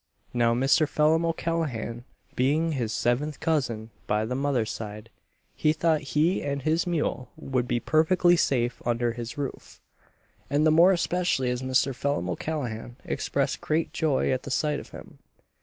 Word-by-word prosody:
Now 120 -1 +2
Mr. 135 +5 +3
Phelim 160 +2 +3
O'Callaghan 155 -8 -2 0.3
being 150 +6 +2
his 120 -7 -2
seventh 135 +7 0
cousin 120 -9 -1 0.2
by 105 +1 +1
the 120 - -3
mother's 130 -5 0
side, 105 +1 -7 0.4
he 155 - +2
thought 160 -1 +1 0.2
he 165 +5 +3
and 140 -1 -3
his 160 +4 +1
mule 150 -7 -1
would 130 -2 -2
be 120 -1 0
perfectly 175 +5 +3
safe 125 -6 0
under 120 0 0
his 120 +5 -7
roof; 140 -2 -6 0.7
and 145 +3 +2
the 155 - +5
more 170 +4 +6
especially 175 -7 +1
as 125 0 -3
Mr. 130 +1 +1
Phelim 125 -9 -1
O'Callaghan 120 - -4
expressed - - -1
great 160 +1 -1
joy 155 -5 +1
at 130 -1 0
the - - -8
sight 150 +2 0
of - - -11
him. - - -12
140 Hz, 155 wpm, -26 LUFS, 120-160 Hz, 0.7 s, more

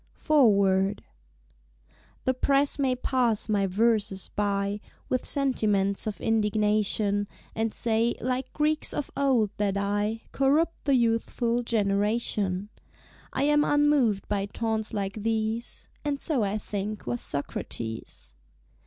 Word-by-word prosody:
Foreword 200 - +3 1.2
The 260 - +2
Press 275 +2 +2
may 260 -2 +2
pass 245 -3 0
my 205 -2 +1
Verses 205 -1 +1
by 200 0 0 0.3
With 255 - -1
sentiments 210 -8 +1
of 210 - -4
indignation, 210 -1 +1 0.3
And 225 0 -1
say, 230 +1 +1
like 255 +1 -2
Greeks 305 0 0
of 295 - -3
old, 255 -7 +2
that 200 -1 0
I 205 +3 -1
Corrupt 300 +5 +1
the 280 -2 +4
Youthful 235 0 +1
Generation; 205 -3 0 0.6
I 265 - -1
am 295 +1 +4
unmoved 290 -9 +2
by 200 -1 -1
taunts 220 0 -2
like 200 0 -3
these 225 +1 -2 0.2
(And 290 -2 -1
so, 290 -6 +1
I 205 0 0
think, 210 0 -4
was 120 0 -2
Socrates). 110 - -5
220 Hz, 120 wpm, -27 LUFS, 200-255 Hz, 1.2 s, the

